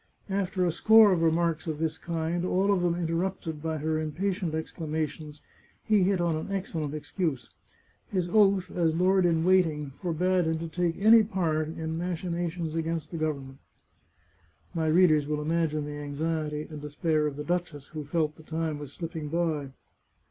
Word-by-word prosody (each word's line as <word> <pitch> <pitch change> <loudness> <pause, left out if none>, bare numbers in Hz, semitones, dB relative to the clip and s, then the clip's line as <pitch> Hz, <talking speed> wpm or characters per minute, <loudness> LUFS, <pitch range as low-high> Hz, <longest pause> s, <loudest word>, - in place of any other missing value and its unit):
After 190 -1 0
a 175 - +2
score 220 +4 +6
of 175 -3 +2
remarks 165 0 +1
of 155 -2 -2
this 160 0 -2
kind, 170 +1 -2
all 190 +2 +2
of 185 - +1
them 175 -1 +1
interrupted 165 -2 -2
by 160 0 -2
her 155 +1 -1
impatient 175 +2 -2
ex 160 - -4
clamations, 155 -2 -4 0.4
he 215 -3 +3
hit 190 0 +2
on 170 -2 +1
an 160 +5 -5
excellent 165 -6 -3
excuse. 150 - -3 0.6
His 185 -3 -1
oath 195 -1 +3
as 165 -3 +1
lord 185 +1 +3
in 165 -1 +2
waiting 165 -6 +2
forbade 180 +1 +1
him 160 0 0
to 165 +1 -4
take 195 +6 +4
part 160 -6 0
in 160 - -7
any 160 - -4
machinations 170 -1 -3
against 165 -1 -2
the 170 - -4
government. 140 -4 -3 1.1
My 165 -2 0
readers 155 -3 +4
will 150 0 -1
imagine 155 -1 0
the 145 0 -6
anxiety 150 +1 -2
and 150 -2 -8
despair 150 +1 0
of 145 - -4
the 150 - -5
duchess, 165 -4 -3
who 155 -1 -6
felt 155 +1 -1
the - - -13
time 160 -1 -3
was 145 -2 -8
slipping 165 -1 -5
by. 160 -4 -1
165 Hz, 170 wpm, -28 LUFS, 155-180 Hz, 1.1 s, score